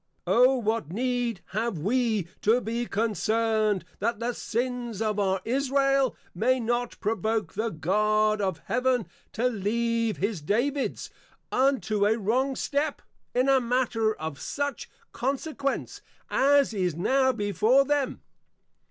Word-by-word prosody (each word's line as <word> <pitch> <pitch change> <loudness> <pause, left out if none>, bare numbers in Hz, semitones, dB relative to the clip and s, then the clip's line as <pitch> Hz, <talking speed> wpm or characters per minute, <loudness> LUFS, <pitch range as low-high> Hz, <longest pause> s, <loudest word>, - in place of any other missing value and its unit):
_ - - -52 0.2
O 250 +3 +5
what 220 - -1
need 240 -2 -1
have 220 -1 -2
we, 215 +1 0
to 225 +4 +4
be 235 0 -3
concerned, 215 -1 0
that 235 -2 -1
the 240 +1 -1
Sins 240 -2 -3
of 215 -2 0
our 190 -1 +1
Israel, 275 +1 +2 0.2
may 255 +8 +2
not 240 +1 -2
provoke 220 -2 -1
the 220 +3 -1
God 215 +5 +1
of 190 -5 -2
Heaven 250 -2 +1 0.3
to 230 - -1
leave 230 0 0
his 200 -3 -2
Davids, 255 - -1 0.4
unto 250 -6 +2
a 220 +2 +2
wrong 255 +6 0
Step, 290 +3 -1 0.3
in 250 +2 +3
a 270 -1 +5
matter 235 -3 +1
of 155 -2 -6
such 285 -2 -3 0.2
Consequence, 275 +2 -3 0.3
as 280 -2 +4
is 180 -5 0
now 260 +9 +2
before 220 +4 +2
them! 290 -1 -1
230 Hz, 130 wpm, -27 LUFS, 210-255 Hz, 0.4 s, O